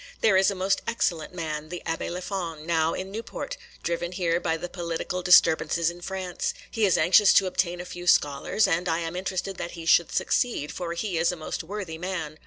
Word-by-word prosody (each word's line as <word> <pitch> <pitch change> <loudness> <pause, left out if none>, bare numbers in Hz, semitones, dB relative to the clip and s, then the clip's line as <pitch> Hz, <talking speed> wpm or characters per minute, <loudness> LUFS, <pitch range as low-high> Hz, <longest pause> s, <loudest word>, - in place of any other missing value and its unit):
There 220 -3 +4
is 190 +1 +5
a 200 - -2
most 190 +1 +1
excellent 175 -9 -1
man, 155 -3 -5
the 175 +1 -6
Abbé 165 - -2
Léfon, 175 -3 -4
now 165 -1 +1
in 190 +1 -5
Newport, 230 - -5 0.3
driven 170 +1 -2
here 175 -2 +1
by 160 -2 -1
the 180 - -5
political 175 +1 -4
disturbances 170 -1 +4
in 175 0 -13
France; 185 -1 -3 0.2
he 220 -2 +2
is 185 - +3
anxious 195 +3 +6
to 195 - +6
obtain 180 -1 -1
a 175 - -6
few 175 0 -8
scholars, 145 +7 +3
and 175 +2 0
I 165 - +1
am 165 +1 -4
interested 185 0 -3
that 170 - -5
he 165 - -7
should 170 +1 +4
succeed, 230 -12 0
for 170 -1 -4
he 175 -1 -2
is 170 - +3
a - - -5
most 160 0 -5
worthy 180 -3 -6
man. 165 -4 -4
175 Hz, 205 wpm, -26 LUFS, 165-190 Hz, 0.3 s, anxious